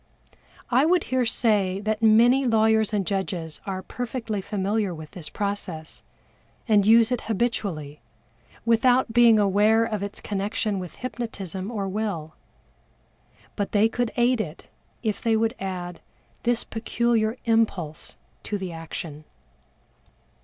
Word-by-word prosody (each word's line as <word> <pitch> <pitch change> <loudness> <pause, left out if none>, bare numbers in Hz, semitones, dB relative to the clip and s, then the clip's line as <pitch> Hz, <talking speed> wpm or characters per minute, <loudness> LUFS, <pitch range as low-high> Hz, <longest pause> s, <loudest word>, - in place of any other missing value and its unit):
I 250 +3 +5
would 345 +2 +3
here 255 -2 +2
say 205 -5 +1
that 215 +1 -1
many 235 +4 +5
lawyers 220 -2 +3
and 205 -3 0
judges 180 -5 -3
are 190 -1 -3
perfectly 230 -4 -4
familiar 200 -1 -1
with 155 -1 -10
this 175 -4 -8
process, 195 -6 -4 0.7
and 210 -3 +4
use 230 +1 +6
it 250 - 0
habitually, 190 -10 -2 0.6
without 240 +1 +3
being 235 -2 +6
aware 210 +3 +4
of 215 -3 -3
its 200 0 -5
connection 205 0 -2
with 180 -2 -7
hypnotism 200 -6 -5
or 205 -5 -3
will. 190 -6 -3 1.2
But 205 - -3
they 210 +1 +5
could 240 0 -2
aid 240 -1 +3
it, 160 -5 -7 0.4
if 215 -3 -1
they 225 -1 +2
would 225 +1 +1
add 180 -2 -5 0.4
this 240 -1 +1
peculiar 225 0 0
impulse 215 -9 0 0.2
to 210 - -3
the 190 -2 -5
action. 165 -2 -7
215 Hz, 130 wpm, -25 LUFS, 190-230 Hz, 1.2 s, use